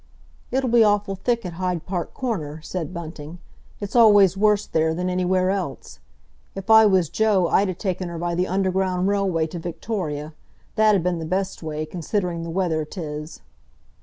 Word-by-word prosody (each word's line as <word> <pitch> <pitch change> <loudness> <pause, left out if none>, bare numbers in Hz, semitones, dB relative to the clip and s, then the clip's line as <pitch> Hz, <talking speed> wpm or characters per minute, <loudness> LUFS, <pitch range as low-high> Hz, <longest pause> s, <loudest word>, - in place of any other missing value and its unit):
"It'll 260 -1 0
be 235 -1 +6
awful 205 -2 +1
thick 235 +3 -1
at 175 - -5
Hyde 180 -1 -3
Park 180 -3 -4
Corner," 160 - -3
said 165 -2 -4
Bunting. 165 -2 -8 0.4
"It's 205 +2 -6
always 205 -5 +6
worse 210 +1 +2
there 160 0 0
than 180 +1 -2
anywhere 185 +1 +1
else. 185 -8 -5 0.6
If 195 +3 -3
I 220 0 +8
was 190 -4 +3
Joe 205 -1 +2
I'd 200 0 +3
'a 185 - -3
taken 185 -2 -3
her 170 - -6
by 175 +1 -2
the 180 +2 0
Underground 185 -1 0
Railway 195 -5 +1
to 165 +2 -6
Victoria—that 170 +3 -2
'ud 185 - 0
been 180 -1 0
the 160 - -4
best 190 +3 -2
way, 155 -1 -4
considering 175 +1 -3
the 165 - -5
weather 165 -3 0
'tis." 150 -1 -7
185 Hz, 170 wpm, -23 LUFS, 165-200 Hz, 0.6 s, I